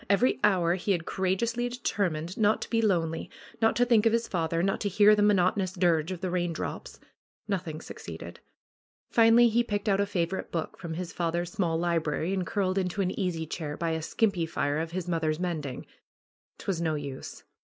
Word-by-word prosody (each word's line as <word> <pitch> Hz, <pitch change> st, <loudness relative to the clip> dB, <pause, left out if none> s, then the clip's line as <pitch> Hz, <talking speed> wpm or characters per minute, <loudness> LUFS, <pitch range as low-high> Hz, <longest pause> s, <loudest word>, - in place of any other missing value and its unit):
Every 200 Hz, +6 st, +3 dB
hour 180 Hz, -5 st, +3 dB
he 190 Hz, +2 st, 0 dB
had 165 Hz, -3 st, -2 dB
courageously 230 Hz, +6 st, 0 dB
determined 185 Hz, -8 st, -2 dB
not 215 Hz, 0 st, +3 dB
to -, -, -9 dB
be 230 Hz, -1 st, +2 dB
lonely, 165 Hz, -6 st, 0 dB, 0.3 s
not 225 Hz, -, +3 dB
to 245 Hz, -, +3 dB
think 230 Hz, -2 st, +4 dB
of 225 Hz, -, +2 dB
his 230 Hz, 0 st, +1 dB
father, 165 Hz, -1 st, -1 dB
not 195 Hz, 0 st, 0 dB
to 205 Hz, -, 0 dB
hear 205 Hz, +2 st, +6 dB
the 210 Hz, -, +1 dB
monoto 205 Hz, -1 st, +3 dB
nous 185 Hz, -2 st, -1 dB
dirge 175 Hz, -2 st, +2 dB
of 185 Hz, -2 st, -5 dB
the 185 Hz, -2 st, -2 dB
raindrops. 175 Hz, -2 st, -3 dB, 0.5 s
Nothing 175 Hz, -6 st, -3 dB
succeeded. -, -, -9 dB, 0.7 s
Finally 230 Hz, +1 st, +6 dB
he 235 Hz, +2 st, +2 dB
picked 205 Hz, -2 st, -3 dB
out 195 Hz, -1 st, +3 dB
a 200 Hz, -, +1 dB
favorite 190 Hz, -1 st, -2 dB
book 165 Hz, -2 st, -3 dB
from 165 Hz, -2 st, -5 dB
his 180 Hz, 0 st, -5 dB
father's 170 Hz, 0 st, -1 dB
small 170 Hz, -4 st, 0 dB
library 165 Hz, 0 st, 0 dB
and 185 Hz, -3 st, -1 dB
curled 195 Hz, -3 st, 0 dB
into 185 Hz, +2 st, -1 dB
an 185 Hz, -, 0 dB
easy 180 Hz, -5 st, -2 dB
chair 155 Hz, -2 st, -5 dB
by 165 Hz, 0 st, -1 dB
a 160 Hz, 0 st, -1 dB
skimpy 180 Hz, 0 st, 0 dB
fire 145 Hz, -2 st, -1 dB
of 165 Hz, 0 st, -2 dB
his 180 Hz, +1 st, -4 dB
mother's 160 Hz, -2 st, 0 dB
mending. 155 Hz, -8 st, -3 dB, 0.7 s
'Twas 180 Hz, -4 st, -3 dB
no 160 Hz, -2 st, 0 dB
use 140 Hz, -3 st, -7 dB
180 Hz, 190 wpm, -28 LUFS, 165-205 Hz, 0.7 s, hear